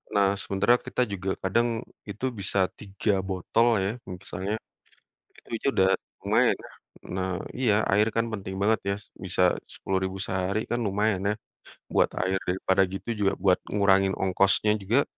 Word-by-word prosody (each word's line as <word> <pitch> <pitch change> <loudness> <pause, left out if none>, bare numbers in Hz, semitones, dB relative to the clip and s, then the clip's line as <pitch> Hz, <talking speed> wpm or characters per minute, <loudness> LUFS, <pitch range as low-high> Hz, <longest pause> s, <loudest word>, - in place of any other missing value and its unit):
Nah, 100 0 +3
sementara 100 +6 +2
kita 125 - -1
juga 95 -4 -3
kadang 120 +6 +2 0.4
itu 105 +5 -4
bisa 100 0 0 0.2
3 100 +1 -1 0.2
botol 95 +5 +1 0.2
ya. 95 - 0 0.2
Misalnya, 95 +2 -4 0.9
itu - - -24
aja - - -4
udah 95 0 +4 0.4
lumayan - - +3
ya, - - -11 0.4
nah 95 0 -1 0.3
iya, 125 -5 +3 0.2
air 105 +2 +5
kan 115 - +3
penting 95 -3 -5
banget 110 +2 +3
ya 100 - +2 0.3
bisa 95 0 0 0.3
Rp.10.000 95 0 -2
sehari 95 +2 -1
kan 120 - 0
lumayan 105 0 +1
ya - - +2 0.6
buat - - +4 0.2
air 95 +1 +1
daripada 95 +1 +2
gitu 95 - -6
juga 100 -1 +2
buat 95 -2 +5 0.2
ngurangin 95 -1 +4
ongkosnya 100 +2 +2
juga 115 +9 +3
100 Hz, 150 wpm, -27 LUFS, 95-105 Hz, 0.9 s, air